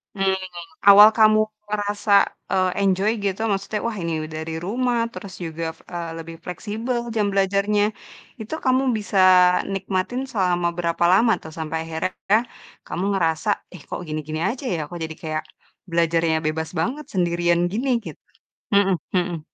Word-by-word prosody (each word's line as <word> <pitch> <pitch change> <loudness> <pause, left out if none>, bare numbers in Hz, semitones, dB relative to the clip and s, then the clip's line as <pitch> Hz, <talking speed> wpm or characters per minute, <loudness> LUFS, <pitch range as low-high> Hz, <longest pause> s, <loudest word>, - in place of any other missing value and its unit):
Mmm, 190 -1 +1 0.5
awal 205 +1 +10
kamu 215 -1 +6 0.3
ngerasa, 205 0 -2 0.4
eee, 185 -1 +2
enjoy 195 +2 +2
gitu, 200 0 -2
maksudnya, 200 +2 -2
"Wah, 230 -2 -4
ini 170 -2 -2
u - - -4
dari 160 +1 -4
rumah, 245 +4 0
terus 200 -4 -9
juga, 165 0 -5
f - - -27
eee, 170 -2 -4
lebih 165 0 -8
fleksibel 220 +7 -3 0.2
jam 210 -2 +2
belajarnya", 200 +1 +2 0.6
itu 220 +6 -7
kamu 260 +1 +3
bisa 205 -2 -1 0.5
nikmatin 195 +5 -2
selama 180 -5 +1
berapa 170 -1 -1
lama, 225 +5 +5
tuh? 160 - -9
Sampai 160 0 -3
akhirnya 165 +5 -1 0.5
kamu 180 - -3
ngerasa, 165 +2 0 0.3
"Ih, 160 - -12
kok - - -4
gini-gini 155 0 -4
aja, 260 +4 -5
ya? - - -3
Kok 175 - -8
jadi 160 0 -5
kayak 155 -1 -2 0.5
belajarnya 165 -1 +2
bebas 160 +1 -2
banget, 260 - -1
sendirian 175 -2 +1
gini", 240 +7 -1 0.2
gitu. - - -9 0.6
Mhm 195 -1 +4 0.2
mhm. 175 -2 -1
190 Hz, 150 wpm, -22 LUFS, 165-210 Hz, 0.6 s, awal